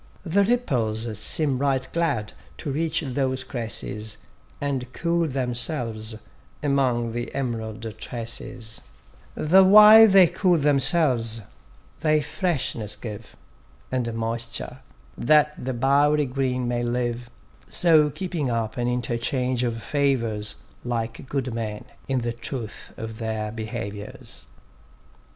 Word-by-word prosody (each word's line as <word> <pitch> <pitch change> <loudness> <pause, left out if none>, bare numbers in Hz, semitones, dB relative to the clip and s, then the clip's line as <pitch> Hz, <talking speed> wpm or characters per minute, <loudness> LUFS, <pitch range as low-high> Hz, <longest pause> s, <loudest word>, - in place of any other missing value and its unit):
The 190 +4 +3
ripples 115 - -1
seem 140 -1 +2
right 135 -2 0
glad 120 -11 -1 0.2
to 145 - -4
reach 160 +2 -1
those 130 0 -1
cresses, 110 -3 -4 0.4
And 130 -3 -3
cool 170 -1 0
themselves 120 -4 -2 0.5
among 130 -5 +1
the 120 +1 -4
em'rald 115 -4 -4
tresses; 115 -1 -5 0.5
The 185 +5 +5
while 215 +3 +9
they 195 -2 +7
cool 180 +1 +2
themselves, 135 -6 +2 0.6
they 155 -1 +3
freshness 135 - -2
give, 110 0 -9 0.6
And 125 -2 -1
moisture, 115 +2 -3 0.4
that 150 +3 +4
the 130 - -2
bowery 145 +4 +3
green 125 -1 -1
may 120 0 -1
live: 120 0 -2 0.4
So 155 -4 +5
keeping 155 -2 -3
up 115 -1 -2
an 120 0 0
interchange 125 +1 -1
of 115 -2 -2
favours, 115 -8 0 0.3
Like 115 +1 -4
good 130 -3 -2
men 110 0 -4 0.2
in 130 -2 0
the 120 0 -2
truth 120 -1 -6
of 110 -1 -7
their 110 -1 -3
behaviours. 110 -2 -7
125 Hz, 115 wpm, -24 LUFS, 115-145 Hz, 0.6 s, while